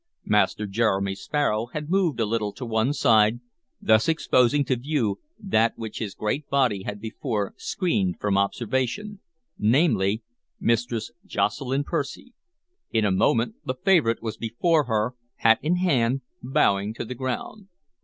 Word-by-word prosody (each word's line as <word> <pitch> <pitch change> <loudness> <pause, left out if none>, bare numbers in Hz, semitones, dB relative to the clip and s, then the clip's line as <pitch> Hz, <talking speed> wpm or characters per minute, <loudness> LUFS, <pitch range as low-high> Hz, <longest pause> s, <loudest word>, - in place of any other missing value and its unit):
Master 105 0 +2
Jeremy 100 -2 0
Sparrow 110 +1 -1
had 150 -1 -4
moved 185 -8 +1
a 115 - +2
little 105 -1 -1
to 130 - -7
one 110 +3 +1
side, 110 -4 +4 0.4
thus 110 +5 +3
exposing 145 -3 +3
to 130 - +1
view 125 -5 -1 0.2
that 115 - +1
which 110 -2 -6
his 105 -3 -4
great 135 +7 -2
body 125 -8 +2
had 105 +2 -5
before 110 -1 -3
screened 100 - -1
from 100 -1 0
observation, 130 - -1 0.4
namely, 110 - +2 0.4
Mistress 115 -1 0
Jocelyn 135 +2 -1
Percy. 145 - -4 0.6
In 110 -2 +1
a 100 - +2
moment 115 +4 +1
the 130 - -3
favorite 160 - +2
was 110 -1 -4
before 145 +7 +1
her, 110 +1 0 0.2
hat 115 -1 +4
in 165 +4 +1
hand, 135 -8 +1 0.2
bowing 105 -4 +1
to - - -4
the 125 - -5
ground. 130 - -5
115 Hz, 145 wpm, -25 LUFS, 105-140 Hz, 0.6 s, side